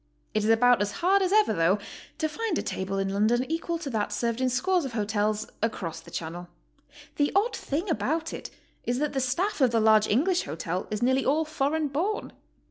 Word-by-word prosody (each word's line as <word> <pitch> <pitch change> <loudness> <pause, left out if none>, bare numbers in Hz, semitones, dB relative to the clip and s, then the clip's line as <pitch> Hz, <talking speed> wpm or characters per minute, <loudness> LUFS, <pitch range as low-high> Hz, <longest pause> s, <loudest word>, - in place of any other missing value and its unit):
It 215 - +1
is 215 - +1
about 245 +1 +5
as 205 0 -1
hard 385 +3 +3
as 375 -1 +1
ever, 425 0 +4
though, 165 +4 +3 0.4
to 315 - 0
find 415 +2 -2
a - - -1
table 190 +1 -3
in 195 0 0
London 215 +5 +2
equal 330 +1 -1
to 325 -4 -5
that 210 -2 -1
served 230 +3 -1
in 260 - +2
scores 350 +8 +1
of 265 -4 -5
hotels 215 0 0 0.2
across 185 -7 -2
the - - -14
Channel. 175 +2 -6 0.7
The 290 -1 +2
odd 425 +5 +2
thing 315 +8 -3
about 320 -1 -1
it - - -6 0.3
is 245 +1 -1
that 295 +1 -1
th'e 270 - 0
staff 310 +9 -1
of 260 - +5
the 230 -1 +2
large 215 -1 +5
English 345 - +2
hotel 165 +4 -4
is 210 +2 -2
nearly 260 +2 +3
all 310 +4 +2
foreign 310 0 0
born. 345 +10 -2
255 Hz, 210 wpm, -27 LUFS, 210-320 Hz, 0.7 s, about